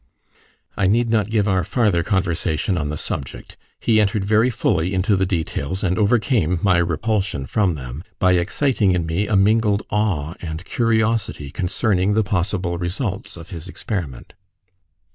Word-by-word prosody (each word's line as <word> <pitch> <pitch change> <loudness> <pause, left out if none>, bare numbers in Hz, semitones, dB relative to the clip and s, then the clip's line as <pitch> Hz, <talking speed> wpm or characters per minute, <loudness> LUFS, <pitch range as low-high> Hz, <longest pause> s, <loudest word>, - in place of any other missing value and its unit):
I 95 - +1
need 115 +3 +2
not 110 -2 +1
give 110 -2 +1
our 95 -3 +2
farther 105 -9 +1
conversation 90 -2 0
on 75 -4 -2
the 75 - -3
subject. 65 - -6 0.2
He 110 -2 +3
entered 100 -1 0
very 110 +4 +3
fully 95 -6 0
into 100 +3 +2
the 95 -1 +1
details, 85 0 -2
and 90 +1 +1
overcame 105 - +2
my 95 -3 +4
repulsion 90 -2 -1
from 95 +3 +1
them, 65 +2 -7
by 95 - +3
exciting 100 +3 +1
in 85 -2 0
me 85 +6 -1
a 105 - +1
mingled 105 +1 +3
awe 95 -8 0
and 80 +1 -6
curiosity 110 - 0
concerning 95 +3 0
the 110 - +3
possible 90 -3 -1
results 95 +2 -4
of 85 +4 -11
his 85 -1 -7
experiment. 90 - -5
95 Hz, 155 wpm, -21 LUFS, 85-105 Hz, 0.2 s, my